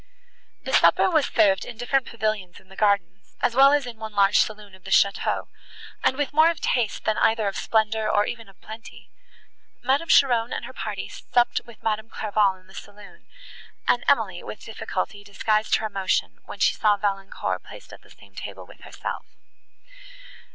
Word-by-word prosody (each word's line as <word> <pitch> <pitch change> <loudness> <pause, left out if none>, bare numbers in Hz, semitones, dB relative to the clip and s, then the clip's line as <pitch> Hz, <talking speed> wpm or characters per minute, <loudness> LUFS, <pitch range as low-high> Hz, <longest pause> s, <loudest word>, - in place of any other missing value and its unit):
The - - -5
supper 380 - +5
was 315 -4 +3
served 195 -2 +3
in 240 - -9
different 250 +2 0
pavilions 215 -5 -3
in 190 - -24
the 190 - -14
gardens, 195 -3 0
as 235 - +1
well 270 +3 +7
as 290 -2 +2
in 240 -2 -8
one 220 -1 -7
large 200 -1 +4
saloon 210 -2 -2
of 190 -1 -17
the - - -9
château, 200 0 +2 0.6
and 260 - +2
with 290 -1 -2
more 315 +2 +6
of 335 -3 -3
taste, 235 -4 -1
than 215 - +1
either 220 -2 +2
of 195 - -3
splendour, 220 -1 0
or 205 0 +3
even 230 -3 -6
of 195 - -21
plenty. 220 +1 -12 0.7
Madame 280 +5 +1
Cheron 245 -6 +4
and - - -4
her - - -10
party - - -5
supped 240 -1 0
with 235 -2 -16
Madame 220 0 -1
Clairval 205 -3 +1
in 185 - -25
the 190 - -18
saloon, 205 0 -13 0.6
and 240 - +2
Emily, 205 -9 +2
with - - -9
difficulty, 210 -2 -4
disguised 215 +2 +1
her 220 - -2
emotion, 190 - -1
when - - -9
she - - +3
saw 210 -1 +2
Valancourt 195 -1 -2
placed - - -13
at - - -12
the - - -22
same - - -18
table - - -8
with - - -17
herself. - - -6
215 Hz, 185 wpm, -24 LUFS, 200-240 Hz, 0.7 s, well